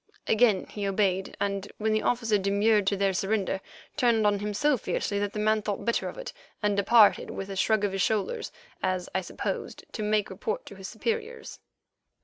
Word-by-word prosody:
Again 220 -3 +3
he 205 -1 -4
obeyed, 195 -1 0
and, 200 0 -2
when 220 0 0
the 215 - +2
officer 230 -4 +1
demurred 200 +1 +2
to 200 - +2
their 195 0 +2
surrender, 195 0 0 0.4
turned 235 -5 +3
on 205 -1 +3
him 210 +1 -3
so 290 +8 +2
fiercely 200 -3 -2
that 205 0 -1
the - - -5
man 215 +1 +2
thought 205 -1 -3
better 235 - 0
of - - -10
it - - -7 0.3
and 205 -1 +2
departed 210 +1 +5
with 195 0 -5
a - - -4
shrug 215 +2 +2
of 205 - +1
his 195 0 -1
shoulders, 220 - -1 0.3
as 185 -1 -1
I 190 - +1
supposed - - -5
to 220 - -5
make 210 -1 +1
report 480 +2 -3
to - - -10
his 190 0 -8
superiors. 455 - -4
210 Hz, 195 wpm, -27 LUFS, 195-225 Hz, 0.4 s, departed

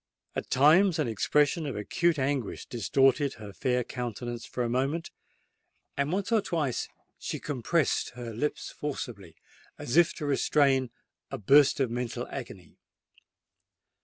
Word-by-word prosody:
At - - -4
times 165 +7 +5
an 155 - 0
expression 150 - +1
of 135 - -4
acute 165 - 0
anguish 135 -4 -2
distorted 135 +4 +2
her 105 -2 -10
fair 125 +2 0
countenance 120 -1 -5
for 125 - -3
a - - 0
moment; 135 +7 -1 0.8
and 140 +2 -1
once 200 +4 -2
or 225 -2 +4
twice 155 -10 -2 0.3
she - - -4
compressed 145 +2 0
her 120 -2 -6
lips 145 +7 -3
forcibly, 115 - -6 0.4
as 120 - -2
if 175 -1 +5
to 150 - -5
restrain 140 -2 +2 0.4
a - - -5
burst 140 +8 +5
of 130 -4 +1
mental 120 0 -3
agony. 95 - -9
135 Hz, 135 wpm, -28 LUFS, 120-150 Hz, 0.8 s, times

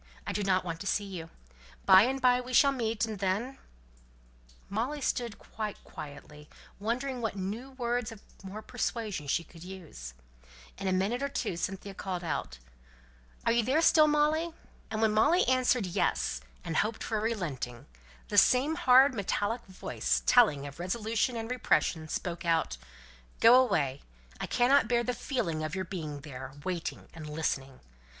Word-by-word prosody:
I - - -2
don't 190 -3 +1
want 165 -2 -4
to 195 - -5
see 205 +1 0
you. 175 -4 -7 0.6
By 190 - +9
and 265 +2 -1
by 250 -1 +4
we 250 +1 -8
shall 280 +3 +6
meet, 225 -4 -1
and 215 -3 -6
then 205 +8 -1 0.5
" - - -28
Molly 245 +9 -2
stood 240 -5 -2
quite 215 -2 -6
quietly, 150 +1 -10 0.3
wondering 245 +4 -2
what 225 -3 -2
new 205 +7 -4
words 240 -2 -2
of 220 -2 -12 0.2
more 200 +3 -7
persuasion 210 - -3
she 170 +5 +1
could 165 0 -14
use. 165 - -9 0.6
In 195 - -3
a - - +2
minute 195 +7 0
or 280 - -1
two 225 -9 -2
Cynthia 195 +3 -4
called 185 -2 -4
out, 65 - -3 0.9
"Are - - +4
you 235 +1 +3
there 260 +7 +2
still, 315 -1 +6
Molly?" 305 +3 +2 0.4
and 220 0 -1
when 220 - +4
Molly 330 - +4
answered 255 -3 +3
"Yes," - - 0 0.2
and 165 - -2
hoped 220 +1 0
for 220 -2 -1
a - - -3
relenting, 155 - -3 0.4
the - - +6
same 265 +5 +4
hard 270 -4 +6
metallic 205 +2 -1
voice, 185 - -2
telling 155 - +5
of 140 +2 -9
resolution 220 +6 -1
and 225 +1 -4
repression, 170 -9 +1
spoke 170 +2 -4
out, 165 - +1 0.6
"Go 230 +1 +8
away. 145 - 0 0.4
I - - -3
cannot 250 0 +4
bear 240 0 +2
the 250 - -1
feeling 170 - -2
of 155 +2 -3
your 190 0 -2
being 155 -6 -5
there 135 -2 -8
waiting 175 -1 -4
and 155 -2 -8
listening. 135 -4 -3
205 Hz, 165 wpm, -30 LUFS, 165-245 Hz, 0.9 s, By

